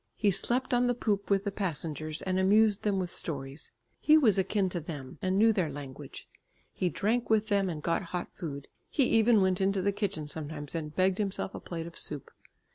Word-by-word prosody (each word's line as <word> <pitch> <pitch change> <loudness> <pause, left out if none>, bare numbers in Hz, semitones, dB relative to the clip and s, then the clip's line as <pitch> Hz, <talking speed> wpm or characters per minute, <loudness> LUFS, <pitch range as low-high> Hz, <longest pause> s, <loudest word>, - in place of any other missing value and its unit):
He 205 -2 +2
slept 250 +7 0
on 245 0 +3
the 245 - +1
poop 205 -4 -1
with 200 -1 +2
the 200 - -2
passengers 155 -5 -4
and 185 0 0
amused 205 +2 +4
them 205 -2 0
with 180 -2 -2
stories; 140 -2 -5 0.3
he 310 0 +6
was 220 -10 +4
akin 195 +1 +1
to 175 - -3
them, 145 -5 -8
and 185 -1 0
knew 225 +2 +5
their 185 -7 0
language. 140 -2 -9 0.5
He 180 - 0
drank 225 +7 0
with 220 0 +2
them 200 -2 +2
and 155 -4 -5
got 170 +2 0
hot 175 +1 -5
food; 140 -6 -6 0.2
he 280 - +2
even 225 -2 +4
went 190 0 +2
into 195 0 +2
the 200 - +2
kitchen 195 -7 -3
sometimes 150 -1 -4
and 155 -2 -4
begged 185 +1 +2
himself 195 -2 -2
a - - -6
plate 165 -2 -6
of 170 0 -7
soup. 145 -3 -5
190 Hz, 205 wpm, -30 LUFS, 160-210 Hz, 0.5 s, he